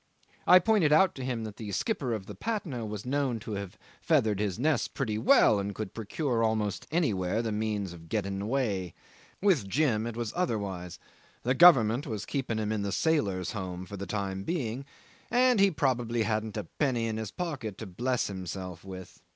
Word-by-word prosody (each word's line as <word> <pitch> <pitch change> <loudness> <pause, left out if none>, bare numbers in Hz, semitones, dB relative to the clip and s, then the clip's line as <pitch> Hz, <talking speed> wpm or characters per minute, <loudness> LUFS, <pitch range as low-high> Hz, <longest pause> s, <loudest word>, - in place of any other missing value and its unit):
I 180 - +10
pointed 185 -4 +3
out 175 +5 +5
to 130 - -7
him 125 -3 -2
that 110 -2 -7
the 105 -3 -6
skipper 130 - -1
of 110 -4 -3
the - - -8
Patna 165 - -3
was 105 0 -6
known 135 -2 0
to 110 - -7
have 100 -2 -5 0.2
feathered 105 -3 +2
his 105 -3 -1
nest 145 +1 0
pretty 110 -6 -1
well, 110 -2 +5
and 100 0 -3
could 110 -4 -5
procure 115 +2 -1
almost 110 -3 -1
anywhere 110 - 0
the 115 - -2
means 105 -3 -2
of 80 -1 -13
getting 100 -3 -2
away. 100 -7 -1 0.5
With 175 - +3
Jim 115 -3 +1
it 120 -1 -5
was 120 -2 -3
otherwise: 100 - -2 0.5
the 125 - +2
Government 130 -6 +6
was 105 -4 -4
keeping 130 -4 -2
him 110 -1 -1
in 110 -1 -1
the 100 0 -2
Sailors' 100 - +1
Home 95 -4 -5
for 100 - -8
the 100 0 -6
time 95 -1 -2
being, 135 - -2 0.4
and 235 - +4
probably 120 -5 +1
he - - +3
hadn't 110 -1 -2
a 105 - -2
penny 120 - -1
in 110 -1 -2
his 110 -2 -4
pocket 135 - -4
to 110 - -6
bless 120 +7 -1
himself 95 -2 -6
with. 95 -2 -10
110 Hz, 190 wpm, -29 LUFS, 100-135 Hz, 0.5 s, I